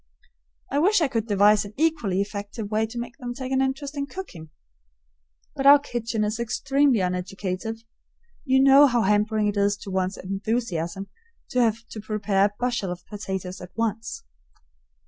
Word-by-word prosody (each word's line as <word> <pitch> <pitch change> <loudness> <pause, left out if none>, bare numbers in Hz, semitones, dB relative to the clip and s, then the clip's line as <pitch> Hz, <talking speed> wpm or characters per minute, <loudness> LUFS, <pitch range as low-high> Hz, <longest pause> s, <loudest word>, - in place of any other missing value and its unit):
I 280 - +1
wish 395 +6 +4
I 320 - +2
could 230 -4 -2
devise 205 0 +4
an 205 0 -11
equally 295 - +1
effective 205 +1 -5
way 220 +1 +1
to 230 +2 -9
make 240 0 -6
them 245 -2 -5
take 260 0 -5
an 265 0 +2
interest 275 +2 -2
in 280 0 -3
cooking. 180 - -9 1.1
But 270 0 +1
our 285 +1 +10
kitchen 230 -5 -3
is 215 +2 -2
extremely 265 +1 +2
uneducative. 185 +4 -3 0.6
You 265 -2 +3
know 275 +1 +8
how 240 -3 +1
hampering 210 +2 +2
it 205 0 -1
is 200 0 +2
to 200 - -9
one's 190 0 -1
enthusiasm 195 -2 -3 0.4
to 250 - +2
have 230 0 +1
to 220 - -6
prepare 210 -2 +1
a 205 - -1
bushel 240 -7 -1
of 180 0 -8
potatoes 190 -3 -5
at 180 - -9
once. 225 0 -2
220 Hz, 165 wpm, -25 LUFS, 200-255 Hz, 1.1 s, our